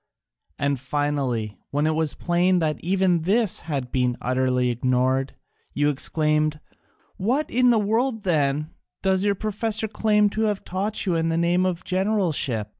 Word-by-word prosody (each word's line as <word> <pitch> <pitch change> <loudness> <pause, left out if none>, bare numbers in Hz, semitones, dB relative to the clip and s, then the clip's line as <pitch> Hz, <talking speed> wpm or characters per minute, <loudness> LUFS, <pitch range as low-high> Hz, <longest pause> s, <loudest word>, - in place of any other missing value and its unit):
And 140 -1 0
finally, 130 -6 -2
when 145 +2 0
it 155 - +2
was 155 -2 0
plain 180 +1 +2
that 155 -3 -1
even 185 -1 +2
this 205 +4 +1
had 140 -6 -4
been 125 -2 0
utterly 125 0 +1
ignored, 130 +2 0 0.4
you 145 0 +2
exclaimed, 150 +1 0 0.6
'What 250 +10 0
in 250 +1 +4
the 235 - +4
world, 225 +2 0
then, 150 -3 0 0.3
does 190 0 +2
your 205 -1 +2
professor 215 +2 -2
claim 210 0 +2
to 220 - -2
have 205 -2 -3
taught 200 +5 -2
you 180 -3 +1
under 165 0 0
the 165 - 0
name 175 +2 +2
of 180 -1 -3
generalship?' 180 - 0
165 Hz, 155 wpm, -24 LUFS, 140-200 Hz, 0.6 s, in